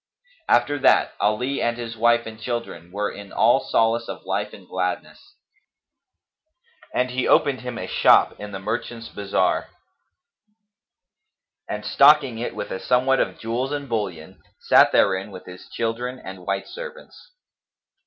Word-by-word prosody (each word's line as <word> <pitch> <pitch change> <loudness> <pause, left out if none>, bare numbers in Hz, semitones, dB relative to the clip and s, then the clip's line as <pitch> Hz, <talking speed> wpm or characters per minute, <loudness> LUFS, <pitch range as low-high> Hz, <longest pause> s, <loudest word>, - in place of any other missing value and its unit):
After 145 +4 +3
that 135 - +4
Ali 125 +7 0
and 120 0 0
his 115 -1 -6
wife 120 +1 +3
and 110 0 -9
children 115 -8 -5
were 105 +2 -2
in 100 -1 -11
all - - +4
solace 115 0 +1
of 95 - -8
life 100 +2 -2
and 95 -3 -14
gladness; 90 -1 -4 1.6
and 125 0 0
he 130 0 -1
opened 140 -3 +3
him 125 -1 -6
a - - -4
shop - - +4
in 105 0 -7
the 100 - -5
merchants' 115 +3 -5
bazar 100 -1 0 2.0
and, - - -4
stocking 140 -6 +5
it 120 - -4
with - - -5
a 95 - -3
somewhat 130 +2 +2
of - - -1
jewels 120 +4 -3
and 145 -1 -4
bullion, 100 -9 -4 0.2
sat - - +5
therein 95 +1 +2
with 95 -2 -11
his 90 0 -12
children 120 +2 -3
and 95 -6 -10
white 100 0 -2
servants. - - -11
115 Hz, 145 wpm, -23 LUFS, 100-125 Hz, 2.0 s, stocking